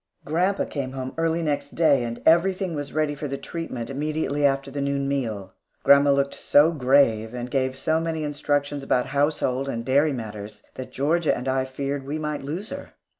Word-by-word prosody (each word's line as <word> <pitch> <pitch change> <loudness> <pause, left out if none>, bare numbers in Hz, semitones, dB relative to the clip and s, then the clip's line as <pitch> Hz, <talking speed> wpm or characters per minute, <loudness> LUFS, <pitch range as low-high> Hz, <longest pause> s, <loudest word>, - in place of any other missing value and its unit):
Grandpa 180 +6 +1
came 135 -3 -4
home 130 -1 -5
early 165 0 0
next 145 -2 -2
day 150 -6 +4
and 115 0 -5
everything 185 +2 +3
was 145 -2 -4
ready 155 -1 0
for 145 +1 -5
the 140 0 -4
treatment 135 -8 -5
immediately 145 +1 -2
after 135 -1 +1
the 140 +1 -3
noon 140 0 -1
meal. 115 -9 -3 0.3
Grandma 140 0 +6
looked 140 0 +2
so 150 +3 +4
grave, 125 -6 +2
and 125 0 -5
gave 130 -1 0
so 160 +4 +1
many 165 -1 -2
instructions 145 -1 -1
about 125 -2 +1
household 140 -2 0
and 115 -2 -4
dairy 145 +4 +3
matters, 105 -4 -7
that 130 - -8
Georgia 155 +4 +1
and 125 +2 -6
I 130 0 +1
feared 140 +1 -3
that 135 - -14
we 150 +2 -2
might 150 -1 -3
lose 165 - -5
her. 280 - -8
140 Hz, 190 wpm, -24 LUFS, 130-155 Hz, 0.3 s, Grandma